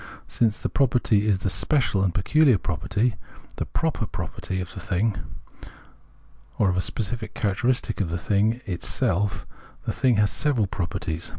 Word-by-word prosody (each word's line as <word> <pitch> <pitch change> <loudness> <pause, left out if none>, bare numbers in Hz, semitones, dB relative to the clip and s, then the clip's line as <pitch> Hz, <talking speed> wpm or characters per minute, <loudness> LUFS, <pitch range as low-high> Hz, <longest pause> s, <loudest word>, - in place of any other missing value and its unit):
Since 110 -2 +1
the - - -2
pro 135 - +3
perty 115 -4 +2
is 100 -3 +3
the 95 - -2
special 125 - +1
and 95 - +2
peculiar 130 - +4
property 100 +7 -1 0.4
[the - - -2
proper - - -1
property] 95 - -4
of, 90 0 -5
the - - -7
thing, 100 +3 0 1.4
or 100 -3 +3
a 90 +1 +1
specific 110 +2 -3
characteristic 115 +2 0
in 95 - 0
the 85 +1 -2
thing 105 +6 +1
itself, 95 +2 -1 0.4
the - - -1
thing 130 -3 +3
has 105 -1 +3
several 135 -8 +1
properties. 85 -3 -3
105 Hz, 155 wpm, -25 LUFS, 95-120 Hz, 1.4 s, peculiar